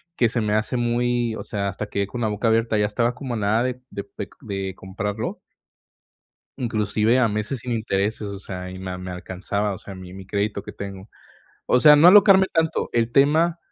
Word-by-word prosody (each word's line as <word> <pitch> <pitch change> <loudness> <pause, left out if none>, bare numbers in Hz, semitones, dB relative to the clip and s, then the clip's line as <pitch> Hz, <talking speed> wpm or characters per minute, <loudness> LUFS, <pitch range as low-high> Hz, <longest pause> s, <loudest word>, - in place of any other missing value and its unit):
que 120 - +3
se 115 0 -1
me 105 -1 0
hace 110 +3 -1
muy, 120 -1 0
o - - -6
sea, 100 -2 -3
hasta 100 +3 -5
quedé 100 -1 -2
con 120 +4 -6
la 110 - +1
boca 105 +2 -1
abierta, 115 0 +2
ya 105 - +2
estaba 120 +3 0
como 125 -1 -5
a - - -2
nada 110 +2 +1
de 125 0 -2
de 100 - -5
pec 100 -1 -9
de 95 -3 -4
comprarlo 100 +3 -4 1.2
inclusive 110 0 +1
a 125 -3 +3
meses 105 +5 -3
sin 125 +1 -4
intereses, 110 -1 -1
o 100 -1 -6
sea, 90 -1 -7
y 95 - -8
me 95 0 -6
a 90 - -5
me 90 0 -7
alcanzaba, 95 +3 -3
o 95 - -6
sea, 100 -1 -10
mi 95 -1 -10
mi 95 0 -10
crédito 100 +1 -2
que - - -9
tengo. 100 0 -8 0.6
O 125 - +3
sea, 150 +1 +8
no 160 +4 +8
alocarme 195 -1 +7
tanto, 160 -1 0
el 115 0 +1
tema 160 +5 +3
110 Hz, 215 wpm, -23 LUFS, 100-120 Hz, 1.2 s, sea